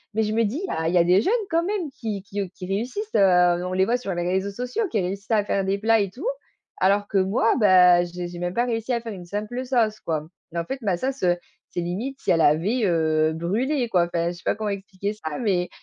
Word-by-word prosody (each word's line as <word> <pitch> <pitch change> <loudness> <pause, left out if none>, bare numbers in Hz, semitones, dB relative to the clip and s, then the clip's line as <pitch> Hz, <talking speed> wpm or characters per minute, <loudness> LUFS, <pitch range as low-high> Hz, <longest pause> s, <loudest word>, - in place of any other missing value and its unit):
mais 220 - +2
je 215 0 -1
me 230 +1 +2
dis: 265 - -2
«Ah, 160 0 -1
il - - -2
y - - +6
a - - +6
des 180 +2 +5
jeunes 415 - +1 0.2
quand 335 +1 +2
même 375 -5 -2
qui 210 -6 -5
qui, 205 0 -6
heu, 195 - -3
qui 185 - -7
réussissent, 250 - -3
heu, 180 -2 +4
on 185 - -3
les 190 0 +3
voit 240 +3 +1
sur 200 -7 -4
les 175 - -1
réseaux 190 +2 0
sociaux 250 - -3
qui 210 -4 +1
réussissent 200 +5 -4
à 210 -2 +3
faire 195 -1 0
des 195 +1 0
plats 225 +1 +3
et 195 -2 -2
tout». 300 - -6 0.6
Alors 205 +2 +3
que 200 - -1
moi, 200 +4 +2
bah, 180 -3 +6
j'ai 175 0 -6
j'ai 175 0 -8
même 175 0 -2
pas 240 +1 +2
réussi 230 +1 -2
à 235 - 0
faire 230 -1 -6
une 180 -2 -9
simple 215 +7 -4
sauce 230 -4 +1
quoi 155 -2 -3 0.3
mais 170 - -1
en 170 - -3
fait 265 +4 -5
ma 195 -5 +1
sauce, 265 +1 -3
heu, 175 -1 +4 0.3
c'est 175 - -3
limite 225 +11 -4
si - - +1
elle 165 -1 +3
avait, 190 +12 +2
heu, 160 -2 +2
brûlé 235 - -1
quoi. 175 -4 +3
Enfin, 170 0 -1
je - - -7
sais - - -16
pas - - +1
comment 215 -1 -3
expliquer 200 0 -4
ça, 155 -8 -6
mais 185 -6 0
200 Hz, 265 wpm, -24 LUFS, 180-230 Hz, 0.6 s, y